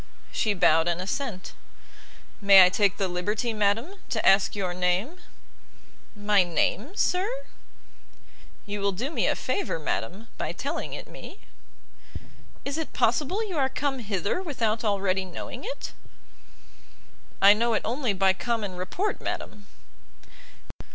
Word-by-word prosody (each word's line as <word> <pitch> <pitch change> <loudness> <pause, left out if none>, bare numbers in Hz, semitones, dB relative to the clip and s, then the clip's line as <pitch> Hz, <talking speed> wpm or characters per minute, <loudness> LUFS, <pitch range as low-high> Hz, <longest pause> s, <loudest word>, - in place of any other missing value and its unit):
She 210 -2 0
bowed 165 -2 +4
an 170 0 0
assent. 195 0 -4 0.9
"May 195 -2 +9
I - - +4
take 200 +1 +2
the 195 - 0
liberty, 210 +6 -2
madam, 220 - 0
to 220 - -1
ask 195 +1 +5
your 185 -3 -2
name?' 180 - 0 1.0
"My 205 -1 +3
name, 205 - -1
sir?" 370 +2 +1 1.4
"You 205 0 -4
will 200 0 +1
do 250 - -3
me - - 0
a - - +2
favour, 395 - -2
madam, 170 - -3
by - - -2
telling - - -4
it - - -7
me." - - -11 1.2
"Is 280 +3 -2
it 320 - -5
possible 370 +9 +1
you 355 -6 -2
are 265 -1 +2
come 270 0 -2
hither 205 - -2
without 230 - -1
already 195 -3 +1
knowing 185 -2 -7
it?" - - -6 1.5
"I 200 +1 +8
know 230 +2 +1
it - - -1
only 245 0 0
by 190 0 +3
common 205 -1 -3
report, 350 - -2
madam." 205 -1 -5
205 Hz, 135 wpm, -26 LUFS, 190-265 Hz, 1.5 s, May